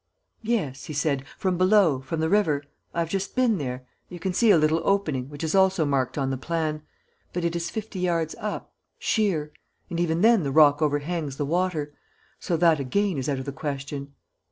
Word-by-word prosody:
"Yes," 210 - -2
he 155 - -6
said. 140 -2 0
"From 185 -2 -1
below, 185 -7 +4
from 155 +4 -3
the 160 - +2
river 160 -7 +2 0.3
I 170 - -1
have 165 - -2
just 195 0 -2
been 245 -6 +2
there 125 -2 -4 0.2
you 175 - -8
can 185 +1 -2
see 230 +5 +3
a 195 - +7
little 155 +1 +2
opening, 155 -10 0
which 145 +1 -8
is 160 - -1
also 190 -3 +4
marked 135 -2 0
on 135 -1 0
the 130 - -3
plan. 155 +1 -2 0.5
But 175 -1 -2
it 170 0 -1
is 170 0 -2
fifty 220 -3 -5
yards 170 -3 0
up, 210 -1 -5 0.2
sheer; 165 -9 0 0.4
and 170 - -2
even 170 -1 +1
then 225 -1 +5
the 140 - -2
rock 145 +1 +5
overhangs 150 -1 -1
the 145 - -1
water. 160 -2 -1 0.5
So 170 - -1
that 165 -2 +4
again 175 +5 0
is 130 - -2
out 140 - 0
of 130 - -5
the 140 - -3
question." 140 0 -5
160 Hz, 205 wpm, -25 LUFS, 145-185 Hz, 0.5 s, a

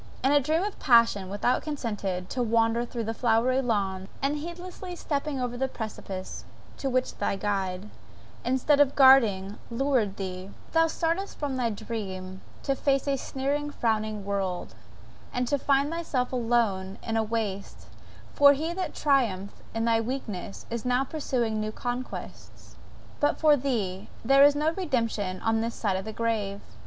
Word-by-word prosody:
In 270 - +4
a 290 - +6
dream 310 +5 +1
of 410 0 -4
passion 230 -6 +4
thou 205 +5 +1
consentedst 210 - -3
to 255 - -2
wander 230 0 +2
through 235 -2 -4
flowery 240 +3 +2
lawns, 195 -5 -1
and 275 +2 0
heedlessly 355 +3 -7
stepping 285 -3 -2
over 245 -1 -2
the 265 +2 0
precipice 205 -6 -6 0.3
to 275 - -2
which 255 0 -1
thy - - 0
guide, 195 -1 -2 0.6
instead 260 +4 +2
of 285 -2 +4
guarding, 220 -8 +5
lured 235 -5 +1
thee, 185 -1 -5 0.2
thou 325 0 +4
startest 335 +4 -2
from 285 -3 -2
thy 245 -2 +1
dream 210 -3 -5
only 185 0 -9 0.2
to 275 - +1
face 275 0 +1
a 280 - +2
sneering, 280 +3 -2
frowning 215 -6 -1
world, 195 -3 -2 0.6
and 250 0 -1
to 285 +2 +1
find 280 +2 +2
thyself 290 -7 -2
alone 225 -6 0
in 225 - -2
a 225 - +3
waste, 215 -3 -3 0.5
for 285 0 +7
he 315 +4 -2
that 370 +1 -4
triumphed 230 -10 +1 0.2
in 225 0 0
thy 225 -1 +3
weakness 220 -6 -5
is 235 -1 -3
now 250 +1 +2
pursuing 250 -6 -1
new 215 0 -2
conquests; 245 +3 -6 0.4
but 290 - +2
for 305 -2 +6
thee 220 -9 -2 0.2
there 275 +3 +7
is 290 0 +7
no 305 +2 +2
redemption 230 - -1
on 225 0 +1
this 230 +1 -2
side 195 -3 -1
the 220 - -4
grave! 215 -3 -1
235 Hz, 160 wpm, -27 LUFS, 205-275 Hz, 0.6 s, for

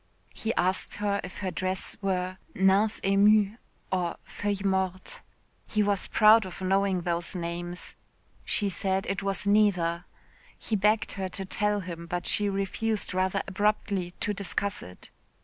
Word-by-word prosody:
He 225 - -2
asked 185 +1 0
her 205 -1 0
if 180 - -8
her 185 - -1
dress 185 +1 -3
were 185 -1 -1 0.2
nymphe 195 +3 +3
émue 205 +2 +4 0.3
or 180 -2 0
feuille 205 -1 -3
morte. 190 -1 -1 0.5
He 215 -1 +1
was 200 -2 0
proud 220 +1 +6
of 180 - -9
knowing 190 0 +1
those 170 0 -1
two 185 - -3
names. 175 +1 -5 0.5
She 205 - +1
said 190 0 0
it 195 - -2
was 195 0 -1
neither. 185 -5 +3 0.5
He 220 - -2
begged 210 +2 +2
her 190 -1 -3
to 195 +1 -5
tell 210 +2 0
him, 170 -2 -7
but 175 0 -3
she 205 -1 +2
refused 200 +2 -2
rather 185 +1 +1
abruptly 195 -2 0
to 210 - 0
discuss 200 0 -2
it. 90 0 -12
195 Hz, 150 wpm, -28 LUFS, 185-205 Hz, 0.5 s, proud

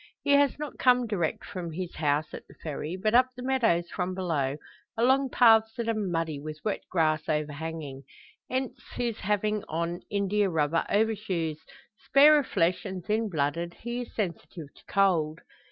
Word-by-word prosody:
He 285 - +1
has 285 -1 +4
not 300 -1 -7
come 250 -1 +4
direct 185 -8 -2
from 175 -4 -6
his 180 +1 -5
house 150 0 0
at - - -9
the - - -17
Ferry, 155 +2 -5
but 215 +3 0
up 250 +1 +6
the 250 - -8
meadows 225 -10 +2
from 180 0 -2
below, 150 -7 -1 0.4
along 265 +3 +3
paths 225 -3 +5
that 235 -2 -3
are 230 - +2
muddy, 165 -8 -2
with 155 +1 -7
wet 210 - -1
grass 155 -3 +1
overhanging. 150 -2 -3 0.4
Hence 260 +1 -3
his 235 -2 -2
having 210 +1 0
on 170 +2 -2
india 200 0 +1
rubber 160 0 +1
overshoes. 200 -7 0 0.4
Spare 295 +2 +7
of 285 - -3
flesh, 180 0 +1
and 190 -3 -6
thin 220 +1 0
blooded, 165 +1 -2
he 240 +1 -4
is 245 - -10
sensitive 170 -6 -5
to - - -20
cold. 165 -6 +2
185 Hz, 170 wpm, -28 LUFS, 160-225 Hz, 0.4 s, Spare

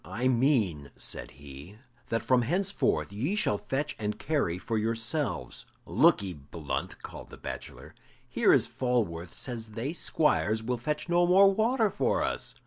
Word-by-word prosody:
"I 100 +10 -2
mean," 115 - +2
said - - -5
he, 70 - -12 0.3
"that 115 - -1
from 130 -1 +4
henceforth 140 - 0
ye 135 - -1
shall 105 - +1
fetch 145 +3 -2
and 105 -1 -2
carry 140 - 0
for 110 +4 -2
yourselves." 115 - -2 0.2
"Look'ee, 95 -2 +3
Blunt," 75 +1 -5
called - - -9
the - - -11
bachelor; - - -8 0.3
"here - - +3
is - - +5
Falworth 105 -10 -1
says 115 -4 -4
they 125 +8 -3
squires 110 -10 +1
will 125 +2 -1
fetch 150 +8 -3
no 175 0 +3
more 195 +2 +6
water 220 0 +2
for - - +1
us." - - -3
115 Hz, 150 wpm, -29 LUFS, 95-150 Hz, 0.3 s, more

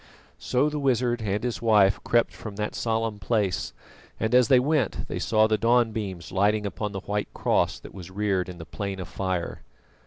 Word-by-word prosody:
So 130 +3 +1
the 150 0 -2
wizard 125 -3 +1
and 105 0 -1
his 120 -3 -2
wife 105 -4 +4
crept 120 0 +2
from 105 -3 -8
that 105 +1 -3
solemn 115 -2 -1
place, 100 -2 0 0.5
and 110 +2 -1
as 125 -2 +6
they 130 0 +6
went 140 -4 0
they - - -4
saw 110 -1 +3
the 110 -1 +1
dawn 115 +1 +3
beams 95 -7 -5
lighting 105 +3 +2
upon 105 +1 -3
the 95 -1 -5
white 105 +1 -3
cross - - +1
that - - -12
was 95 -2 -9
reared 95 -2 -1
in 90 - -8
the 80 - -8
Plain 100 +2 -5
of 90 - -5
Fire. 95 -3 -3
105 Hz, 195 wpm, -26 LUFS, 95-120 Hz, 0.5 s, as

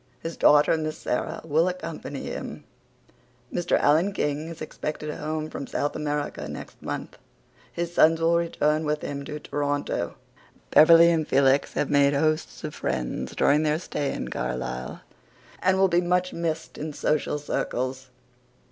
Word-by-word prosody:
His 165 0 -5
daughter, 150 +2 +5
Miss 155 -1 -3
Sara, 125 - -2
will 160 +3 +2
accompany 165 -6 -5
him. - - -6 0.9
Mr. 175 - +1
Alan 165 +7 +3
King 150 -3 -1
is 165 0 -8
expected 150 0 -5
home 155 0 -3
from 140 - -6
South 145 - -2
America 145 - -3
next 75 - -9
month. - - -6 0.5
His 170 0 -3
sons 165 -1 +5
will 165 +1 +3
return 160 -2 +1
with 150 0 -1
him 140 0 -4
to 150 +1 -5
Toronto. 145 -1 -2 0.6
Beverley 165 +2 +8
and 160 -2 0
Felix 135 +1 +3
have 150 - -1
made 140 0 +4
hosts 155 +2 0
of - - -4
friends - - -3
during 150 +2 +4
their 155 0 +1
stay 145 -4 -3
in - - -4
Carlisle 65 0 -4 0.6
and 185 +1 +3
will 195 0 +5
be 175 -1 +2
much 180 +1 0
missed 165 -1 -3
in 155 0 -4
social 150 0 0
circles. 130 -2 -3
150 Hz, 150 wpm, -26 LUFS, 145-165 Hz, 0.9 s, Beverley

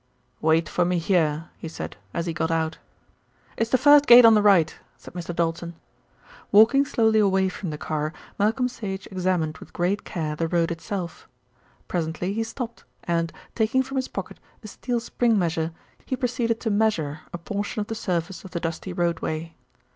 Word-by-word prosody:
"Wait 160 +1 +3
for 180 - +1
me 180 +1 +1
here," 165 -2 +1
he - - -6
said, 160 - -6 0.2
as 170 - -2
he 170 - -2
got 160 +1 -1
out. 160 -1 -1 0.8
"It's 225 - -1
the 255 - +4
first 290 +2 +6
gate 240 0 +10
on 225 - +8
the 210 - +5
right," 190 -6 +4 0.2
said - - -13
Mr. 175 -1 -5
Doulton. 170 0 -2 0.8
Walking 230 +7 +6
slowly 220 -4 +3
away 190 -2 +3
from 180 0 -6
the 150 - -4
car, 155 0 -2 0.3
Malcolm 225 +5 +2
Sage 205 -6 -6
examined 180 -4 -1
with - - -13
great 185 +4 0
care 155 -5 -3
the 165 +2 -1
road 170 0 +1
itself. 170 +1 -5 0.6
Presently 175 +2 -2
he 225 - -1
stopped 235 +1 -6 0.2
and, 165 -1 0 0.2
taking 230 +4 +2
from 270 +1 -5
his 260 - 0
pocket - - -7 0.2
a - - -8
steel 240 +3 -3
spring 230 -1 +1
measure, 165 -3 0 0.3
he 260 - -2
proceeded 240 -3 -1
to 225 - -1
measure 190 -9 +1
a - - -4
portion 205 +5 -4
of 210 - -1
the 225 - -5
surface 180 -4 -3
of 190 - -9
the 175 - -3
dusty 170 +2 -4
roadway. 165 -2 -2
185 Hz, 180 wpm, -24 LUFS, 165-220 Hz, 0.8 s, gate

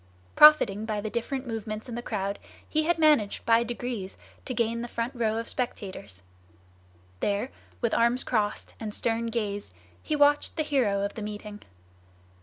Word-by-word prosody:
Profiting 230 -9 +7
by 215 -2 -1
the 210 +1 -4
different 255 +3 -3
movements 220 -1 -5
in 240 - -6
the 240 - -3
crowd, 200 -3 -3 0.3
he 310 0 +1
had 345 +1 +2
managed 300 -10 +3
by 230 0 +5
degrees 235 -4 -5 0.3
to 255 - -3
gain 235 0 0
the 240 - -4
front 235 +2 -3
row 225 -3 0
of 230 - -3
spectators. 185 - -5 1.0
There, 205 +5 -1 0.3
with 235 -2 +1
arms 235 +2 +2
crossed 210 -3 -1
and 215 -2 -4
stern 230 0 0
gaze, 205 - -3 0.3
he 305 - -1
watched 290 +2 +3
the 310 - +1
hero 240 -10 +1
of 200 - -2
the 220 - -7
meeting. 210 0 -7
230 Hz, 165 wpm, -27 LUFS, 210-250 Hz, 1.0 s, Profiting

